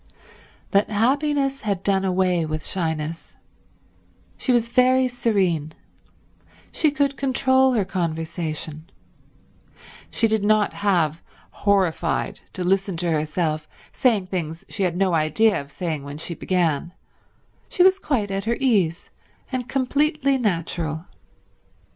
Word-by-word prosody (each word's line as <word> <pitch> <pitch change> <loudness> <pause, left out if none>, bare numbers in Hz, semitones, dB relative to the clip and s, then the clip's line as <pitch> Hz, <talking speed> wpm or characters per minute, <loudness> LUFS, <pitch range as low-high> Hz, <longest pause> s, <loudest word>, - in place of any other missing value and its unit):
But 200 0 +3
happiness 275 +5 +1
had 200 -4 -2
done 195 -1 +2
away 185 -2 +1
with 155 0 -4
shyness—she 160 -2 -3 1.2
was 235 -1 +2
very 255 +1 +4
serene; 190 -11 0 1.0
she 315 - +2
could 280 -1 0
control 260 -1 +2
her 215 -5 +1
conversation; 160 -2 -4 1.2
she 225 - +2
did 220 -2 0
not 215 0 +3
have, 170 -6 +1 0.3
horrified, 190 -5 0
to 185 - -3
listen 195 0 +1
to 170 0 0
herself 155 0 -1 0.2
saying 225 -8 +2
things 170 -3 -4
she 210 - -5
had 180 -2 0
no 190 -2 +2
idea 165 +6 +2
of 140 0 -14
saying 160 -2 -3
when 140 +1 -7
she 165 +2 -3
began; 170 -2 -1 0.8
she 360 - +3
was 380 +1 +5
quite 235 - -1
at 195 +1 -2
her 235 +1 0
ease, 200 -11 +1 0.4
and 255 -1 -3
completely 275 +1 +1
natural. 170 - -2
195 Hz, 120 wpm, -23 LUFS, 165-245 Hz, 1.2 s, was